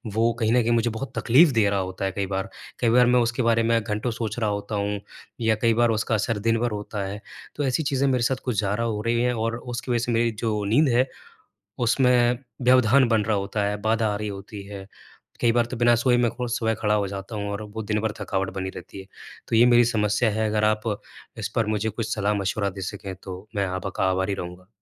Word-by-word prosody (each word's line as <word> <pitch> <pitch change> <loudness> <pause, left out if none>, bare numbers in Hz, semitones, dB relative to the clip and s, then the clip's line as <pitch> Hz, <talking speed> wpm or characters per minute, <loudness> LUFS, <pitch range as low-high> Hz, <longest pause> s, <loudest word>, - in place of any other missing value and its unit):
वो 115 +1 +3
कहीं 110 0 +1
न 125 - +4
कहीं 120 - 0
मुझे 115 0 +2
बहुत 115 +5 -6
तकलीफ 145 +8 +5
दे 105 -2 +4
रहा 100 -1 0
होता 95 +1 -3
है 95 - -1
कई 100 0 -2
बार। 95 0 -3 0.3
कई 115 - +2
बार 125 +1 +5
मैं 125 0 +4
उसके 120 +2 0
बारे 115 0 +3
में 115 0 +2
घंटों 105 +3 -2
सोच 110 0 -4
रहा 110 -2 +1
होता 100 +1 -3
हूँ, 100 0 -1 0.4
या 110 -1 +3
कई 115 -1 +4
बार 120 +1 +3
उसका 110 +1 0
असर 105 +1 -1
दिन 115 +2 +1
भर 120 -1 0
होता 105 -1 -4
है। 105 +1 -6 0.3
तो 145 - -2
ऐसी 135 +5 0
चीज़ें 140 -1 +1
मेरे 125 -2 +1
साथ 130 +1 +1
कुछ 115 -6 0
ज़्यादा 105 +3 -1
हो 110 -2 -2
रही 115 0 +1
हैं 125 0 +1
और 115 +1 -2
उसकी 120 +1 -5
वज़ह 120 - +2
से 120 - -1
मेरी 115 0 +2
जो 105 -2 0
नींद 140 +8 +3
है, 130 +2 +3 0.7
उसमें 125 0 +3 0.3
व्यवधान 130 +1 +5
बन 110 -2 +3
रहा 110 -2 +1
होता 100 +1 -2
है, 105 0 -1
बाधा 110 0 +1
आ - - -2
रही 105 0 -4
होती 100 +1 -8
है। 100 -1 -8 0.6
कई 115 - +4
बार 120 0 +2
तो 125 - -6
बिना 120 0 +4
सोए 120 +1 +2
में 120 -1 +2
खु 125 0 -4
सुबह 115 -2 0
खड़ा 105 -1 +2
हो 100 -2 0
जाता 100 +3 -7
हूँ 100 -1 -3
और 100 +1 -4
वो 110 - -3
दिन 105 0 -1
भर 110 -1 -1
थकावट 95 -1 -1
बनी 95 0 -3
रहती 100 - -10
है। - - -13 0.4
तो 115 - +1
ये 120 - +7
मेरी 120 -1 +6
समस्या 110 0 +1
है, 110 +1 0
अगर 105 0 0
आप 110 0 +2 0.6
इस - - -3
पर 115 -2 +1
मुझे 110 0 0
कुछ 110 +2 -3
सलाह-मशविरा 100 -1 0
दे 95 0 -8
सकें? 95 +1 -5
तो 95 +2 -9
मैं 100 -1 +1
आप 95 +1 -4
का - - +2
आभारी 95 +2 0
रहूँगा। 90 0 -8
110 Hz, 245 wpm, -24 LUFS, 100-120 Hz, 0.7 s, ये